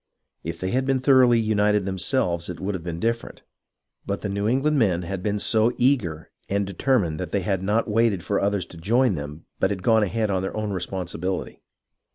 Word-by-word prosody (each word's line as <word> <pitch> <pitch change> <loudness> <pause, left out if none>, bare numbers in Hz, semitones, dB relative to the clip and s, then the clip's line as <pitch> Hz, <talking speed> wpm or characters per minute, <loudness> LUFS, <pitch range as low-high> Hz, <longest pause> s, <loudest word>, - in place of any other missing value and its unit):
If 85 +1 -5
they 95 0 -2
had 130 +1 +1
been 135 0 +1
thoroughly 130 -3 +5
united 105 -2 +2
themselves 90 -3 0
it 90 - -6
would 100 +2 -2
have 90 -3 -5
been 85 -1 -5
different, 115 +2 -3 0.6
but 100 - -3
the 105 - -3
New 100 +1 -1
England 135 +5 +2
men 90 -7 +2
had 95 +2 -4
been 105 +2 -1
so 110 +3 +3
eager 105 - 0 0.2
and 100 0 0
determined 95 - 0
that 90 - -4
they 100 - 0
had 95 0 -1
not 105 +5 +1
waited 110 -4 +1
for 100 - 0
others 100 -2 0
to - - -11
join 115 +7 +2
them 75 0 -7
but 95 - +2
had 95 -3 -4
gone 110 -2 +4
ahead 105 +1 0
on 95 -1 0
their 95 +3 -4
own 105 -1 -2
responsibility. 90 0 -4
100 Hz, 205 wpm, -24 LUFS, 90-115 Hz, 0.6 s, thoroughly